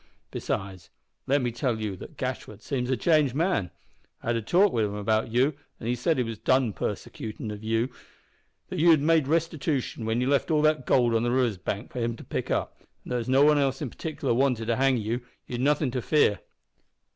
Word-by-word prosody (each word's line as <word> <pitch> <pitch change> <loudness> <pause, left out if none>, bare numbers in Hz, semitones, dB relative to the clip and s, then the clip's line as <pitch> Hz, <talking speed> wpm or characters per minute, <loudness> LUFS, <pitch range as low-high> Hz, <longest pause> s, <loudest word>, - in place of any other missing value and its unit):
Besides, 95 -3 -4 0.4
let 140 0 +2
me 120 - 0
tell 120 -1 -1
you 105 -3 -3
that - - -11
Gashford - - -5
seems 125 -2 -2
a 130 - +1
changed 150 -3 +3
man. 165 - +1 0.5
I've - - -3
had 120 - +2
a - - -2
talk 180 - +3
wi' 115 - +1
him 105 -1 -1
about 110 +2 0
you, 130 +6 +3 0.3
an' - - -8
he 120 - +1
said 125 +7 0
he 125 - +2
was 115 -2 -6
done 130 -4 +2
persecutin' 110 +2 -5
of 105 0 -8
you 115 +2 +1 0.8
that 185 - -4
you 170 +2 +5
had 160 -3 +7
made 160 -2 +3
restitootion 155 -6 -1
when 110 +1 0
you 125 - 0
left 140 +3 +2
all 155 -2 +2
the 155 0 +6
goold 125 -5 +2
on 115 - +2
the 120 - 0
river's 120 -5 +1
bank 100 +4 -4
for 125 - -5
him 115 -1 -1
to - - -11
pick - - -4
up, - - -2 0.2
and - - -10
that 125 - +1
as 120 - -5
nobody 145 +3 +5
else 135 -1 0
in 140 -7 -4
partikler 145 -6 -2
wanted 125 -2 +1
to 115 +1 +1
hang 135 -1 +3
you, 115 +3 -2 0.2
you'd 120 0 -4
nothin' 145 -1 +2
to 125 0 -2
fear." 145 -7 +3
125 Hz, 220 wpm, -27 LUFS, 115-145 Hz, 0.8 s, had